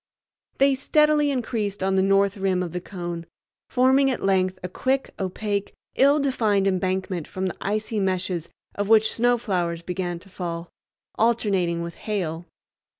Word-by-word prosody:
They 275 0 +4
steadily 300 +2 +3
increased 220 -7 -2
on 190 0 +1
the 190 - +3
north 195 +1 +3
rim 190 -2 0
of 175 - -5
the 180 +1 -4
cone, 175 -3 -6 0.4
forming 265 +2 +4
at 255 - -2
length 185 -1 +2
a - - -2
thick, 265 +8 -1
opaque, 200 +1 -2 0.2
ill 280 +2 +5
defined 220 -8 +1
embankment 185 -2 -1
from 190 0 -4
the 185 - -3
icy 215 +2 -1
meshes 185 -3 -1 0.2
of 205 0 -3
which 220 -1 +5
snow 245 +1 +3
flowers 175 -7 -2
began 180 -1 -3
to 185 +3 -14
fall, 170 -2 -5 0.5
alternating 195 -7 +1
with 170 0 -6
hail. 175 -5 -3
195 Hz, 150 wpm, -24 LUFS, 180-225 Hz, 0.5 s, ill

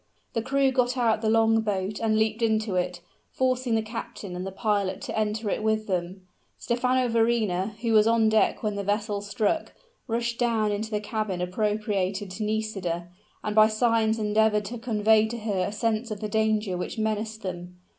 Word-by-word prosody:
The 230 - 0
crew 270 +2 +2
got 250 0 +1
out 225 -3 +2
the 220 - +1
long 225 0 +4
boat 205 -1 -2
and 220 -1 +1
leaped 220 +1 +1
into 220 -2 +1
it, 180 -1 -1 0.3
forcing 255 -2 0
the 220 - +1
captain 215 -4 -7
and 180 +2 -4
the - - -5
pilot 200 -2 0
to - - -5
enter 215 0 -1
it - - -1
with 220 0 +1
them. 185 0 -3 0.3
Stephano 250 +1 +1
Verrina, 225 -4 +1
who 230 -2 +1
was 215 0 +6
on 230 -1 +4
deck 220 +1 +2
when 210 -1 0
the 200 0 -3
vessel 205 0 -1
struck, 205 +9 -1 0.3
rushed 235 0 -2
down 225 -3 +1
into 210 +2 -2
the 210 -2 -1
cabin 215 -3 -3
appropriated 200 0 -1
to 215 +4 -4
Nisida, 195 -6 -2 0.3
and 210 0 -2
by 215 0 +7
signs 225 0 +2
endeavored 210 0 +2
to 235 +3 -6
convey 220 -2 +3
to 235 +2 -5
her 205 -5 -1
a - - -4
sense 225 +2 -1
of 210 -2 -5
the 215 - -3
danger 215 -2 +1
which 180 +6 -4
menaced 220 0 -2
them. 180 -1 -6
215 Hz, 185 wpm, -26 LUFS, 205-225 Hz, 0.3 s, by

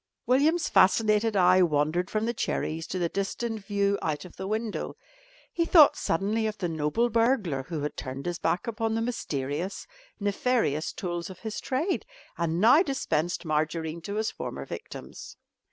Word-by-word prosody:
William's 300 +6 +3
fascinated 215 +2 +4
eye 185 -1 +5
wandered 160 +2 +1
from 215 0 -1
the 235 - 0
cherries 160 -7 -2
to - - -3
the 175 -2 +1
distant 210 +4 -3
view 200 0 0
out 155 +1 -2
of 180 - -13
the 190 - -5
window. 220 +1 -3 0.6
He 335 - +1
thought 330 -3 +7
suddenly 210 +6 0
of 215 0 -4
the 180 - -2
noble 160 +8 0
burglar 225 - +2
who 160 -3 -3
had 150 - -3
turned 130 +1 -6
his 175 -1 -3
back 165 +2 0
upon 225 -1 -1
the 225 - 0
mysterious, 165 - -3 0.3
nefarious 205 - 0
tools 175 -1 -4
of 185 - -11
his 220 -1 -4
trade 300 +9 -1 0.3
and 170 0 -1
now 245 - +7
dispensed 180 - -1
margarine 160 +1 -1
to 200 +5 -5
his 220 +1 0
former - - -6
victims. 460 +2 -9
195 Hz, 165 wpm, -27 LUFS, 165-225 Hz, 0.6 s, thought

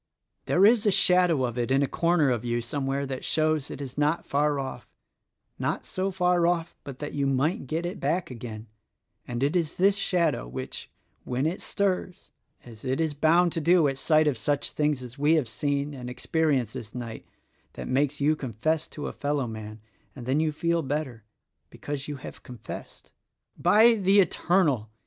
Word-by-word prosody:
There 185 +3 +5
is 220 0 +5
a - - +5
shadow 180 -6 +4
of 120 -1 -2
it 120 - -1
in 135 +1 +3
a - - +1
corner 170 -4 +2
of 120 -2 -1
you 120 0 -1
somewhere 135 +3 -2
that 130 -1 -5
shows 155 -2 +1
it - - -7
is 140 0 -6
not 150 +3 +1
far 145 0 +1
oft, 135 -1 -6 0.4
— - - -48
not - - -2
so 190 +1 -2
far 180 -2 +2
off 170 -1 -1
but 135 -2 -8
that 145 +1 -6
you 140 -1 0
might 135 +2 0
get 165 +5 -2
it 180 +4 -4
back 175 -5 -1
again; 115 -3 -7 0.6
and 120 +1 -3
it 145 +5 +1
is 165 -3 0
this 195 +2 +4
shadow, 165 - 0
which, - - -6 0.3
when 125 +3 -1
it 170 +4 -1
stirs, 185 -2 -2 0.2
— - - -33
as 115 -3 -13
it 130 +3 -1
is 160 -2 0
bound 165 +4 +3
to 165 - -2
do 170 0 +4
at 135 -1 -2
sight 155 +1 +3
of 135 -6 0
such 145 +4 -1
things 150 -3 0
as 125 +2 -10
we 150 +3 +4
have 150 -7 +1
seen 140 +5 -2
and 125 -2 -7
experienced 135 -3 0
this 120 -4 -8
night 115 -2 -7 0.2
— - - -41
that - - -7
makes 140 +2 0
you 150 +2 +3
confess 150 +5 -2
to 150 - -7
a - - -4
fellowman; 110 -7 -3 0.3
and 125 -4 -8
then 135 +4 +1
you 155 0 +1
feel 170 +2 0
better 135 -6 -4 0.2
— - - -52
because 145 -1 -6
you 150 - -4
have 130 - -10
confessed. 125 -2 -10 0.4
"By 215 +7 +5
the 200 -2 +3
Eternal!" 165 - +2
145 Hz, 195 wpm, -27 LUFS, 130-170 Hz, 0.6 s, There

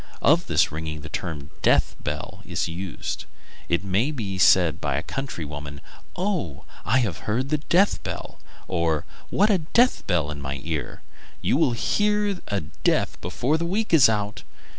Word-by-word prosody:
Of - - +4
this - - +3
ringing 75 -1 -4
the 75 - -8
term 75 -5 -5
"death - - +3
bell" - - -5
is - - -2
used. 90 +3 -5 0.4
It 85 +2 +1
may 100 +8 +1
be 105 -10 -4
said 85 -5 +5
by - - 0
a - - -2
country 135 - -4
woman: 70 -1 -7 0.4
"Oh! 175 - -2 0.2
I 130 +4 +3
have 105 -4 -3
heard 130 +7 0
a 150 - +2
death 180 +6 +3
bell!" - - -6 0.3
or, 85 -4 0 0.2
"What 210 +3 +3
a 195 - +3
death 235 +10 +2
bell 80 -4 +1
in 70 -1 -6
my 70 0 -4
ear! 75 -6 -4 0.4
You - - +2
will 145 -4 +3
hear 210 - +1
of 190 - -6
a 100 -2 -1
death 75 - -1
before 125 - 0
the 170 - -1
week 210 +2 -1
is 145 -8 +8
out." 105 -1 -1
100 Hz, 175 wpm, -25 LUFS, -, 0.4 s, is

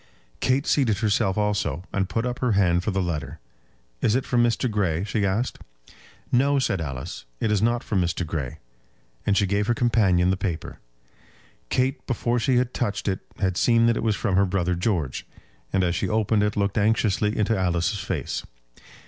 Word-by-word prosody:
Kate 130 +3 +1
seated 120 -8 +2
herself 105 -1 +1
also, 100 -7 0
and 95 -1 0
put 115 +2 -1
up 125 0 -3
her 125 -4 +1
hand 90 -3 +3
for - - -1
the 95 -2 0
letter. 85 -4 -4 0.6
"Is 110 - +2
it 130 - 0
from 120 -1 +2
Mr. 120 +1 +1
Grey?" 95 -7 0
she 105 0 -1
asked. 105 +7 -1 0.7
"No," 140 +3 +3
said 100 -9 0
Alice; 65 -4 -6
"it 110 - 0
is 105 -2 +2
not 120 +1 +1
from 100 -4 0
Mr. 85 0 -1
Grey." 75 -6 -4 0.7
And 100 -1 +3
she 100 - +3
gave 100 +2 0
her 120 - +2
companion 100 -7 +3
the 95 - 0
paper. 90 -5 -4 0.9
Kate 130 +1 0
before 120 -1 0
she 130 +2 +2
had 125 0 +1
touched 105 -4 -2
it 95 -2 0 0.2
had 95 -2 0
seen 115 +1 +4
that 115 0 +3
it - - -2
was 110 -2 +1
from 95 -1 0
her 100 - +5
brother 90 -1 0
George; 90 - -1 0.4
and 95 -1 +2
as 85 -1 +1
she 95 +2 -1
opened 110 0 +2
it 105 0 0
looked 100 +1 +1
anxiously 105 0 +1
into 110 +1 +2
Alice's 90 +2 0
face. 90 -7 -3
105 Hz, 190 wpm, -24 LUFS, 90-115 Hz, 0.9 s, her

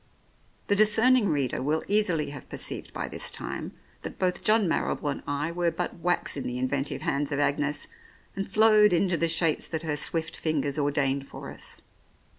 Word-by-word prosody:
The 205 - +2
discerning 220 +2 +4
reader 140 -5 0
will 150 +4 0
easily 180 -8 +1
have 145 - -10
perceived - - -5
by - - -4
this - - -4
time - - -6 0.3
that - - -7
both 180 -1 0
John 215 -2 +4
Marrible 150 -2 -1
and - - -5
I 145 +3 -1
were 175 0 +1
but 170 +1 -4
wax 175 +1 +1
in 140 - -4
the 125 - -3
inventive 135 +2 -2
hands 140 +1 -1
of 140 - 0
Agnes, 145 0 0 0.5
and 195 0 -4
flowed 215 -1 +5
into 180 +1 +2
the 170 0 +1
shapes 165 -1 +2
that 160 -1 -3
her 155 -2 -1
swift 160 +2 -2
fingers 150 -2 -1
ordained 140 -1 0
for - - -8
us. - - -9
160 Hz, 180 wpm, -27 LUFS, 145-185 Hz, 0.5 s, flowed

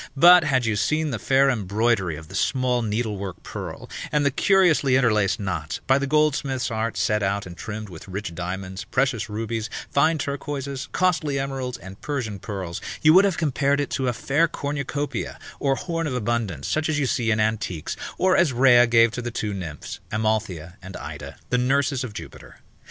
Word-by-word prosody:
But 175 +4 +8
had 130 -5 +2
you 110 -2 +1
seen 155 +8 0
the - - -3
fair 135 0 +3
embroidery 105 - +1
of 80 +1 -10
the 95 - -13
small 125 +5 +1
needlework 105 -4 -3
purl, - - -7 0.2
and 150 -1 +2
the 140 - +3
curiously 160 -5 +4
interlaced 105 -6 +2
knots, 90 -6 -3
by 135 +1 +4
the 140 - -1
goldsmith's 140 -4 +1
art 110 0 -2
set 105 0 +1
out 100 +1 -1
and 90 -1 -9
trimmed 110 +4 -6
with 90 -2 -11
rich 95 -2 -5
diamonds, 95 +2 -5
precious 125 -5 0
rubies, 110 +1 -3 0.2
fine 155 +3 +3
turquoises, 140 -1 -4
costly 165 -6 +1
emeralds, 135 -2 -3
and 95 +2 -12
Persian 120 -9 -3
pearls, 95 -5 -5 0.2
you 155 0 +7
would 190 +3 +7
have 195 -4 0
compared 140 -2 +1
it 145 - -2
to 130 - -1
a - - +3
fair 145 +7 +2
cornucopia, 145 -1 -3 0.2
or 135 -1 +2
horn 165 +2 -3
of 130 - -2
abundance, 110 - -2
such 155 +1 0
as 155 - +1
you 145 - +1
see 120 -2 0
in 110 -1 +2
antiques, 110 -7 -1 0.2
or 185 0 +3
as 170 -6 +4
Rhea 120 -1 +6
gave 115 -1 +5
to 125 - -4
the 120 - -3
two 105 -3 -3
nymphs, 85 -6 -6
Amalthea 105 -5 -1
and 95 0 -8
Ida, - - -8
the 125 - +3
nurses 135 +1 +1
of 120 -5 -6
Jupiter. - - -10
120 Hz, 185 wpm, -24 LUFS, 105-140 Hz, 0.2 s, But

